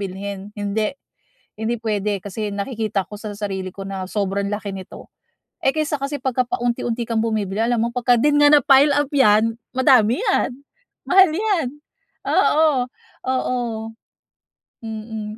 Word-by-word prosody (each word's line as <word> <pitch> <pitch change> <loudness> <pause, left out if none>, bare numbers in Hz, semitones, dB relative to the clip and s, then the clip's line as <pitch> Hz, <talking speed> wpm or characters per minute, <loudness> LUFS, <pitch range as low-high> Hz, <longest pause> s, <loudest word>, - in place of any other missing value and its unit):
bilhin, 195 +1 -6
hindi, 205 +1 -1 0.7
hindi 225 +2 -1
puwede 210 -2 -1
kasi 210 +1 -4
nakikita 210 -2 -2
ko - - -10
sa 215 - -6
sarili 190 -3 -3
ko 195 - -7
na 195 -1 -4
sobrang 200 -1 -1
laki 205 -1 -4
nito. 190 -1 -10 0.6
Eh 270 - +4
kaysa 310 -1 0
kasi, 275 +1 -4
pagka 255 -1 +1
paunti-unti 240 -1 -1
kang 230 -1 0
bumibili 210 -4 -1
alam 235 -1 +1
mo 235 - +1
pagka 245 0 +3
din 295 +3 +3
nga 290 - +7
napile-up 285 0 +5
'yan 225 -3 +4 0.2
madami 255 - +4
'yan. 395 - +1 0.6
Mahal 375 -2 +6
'yan, 390 -6 0 0.6
oo, 295 -5 +3 0.4
oo 255 -1 0 1.3
mm, 220 -1 -6
225 Hz, 135 wpm, -21 LUFS, 205-265 Hz, 1.3 s, nga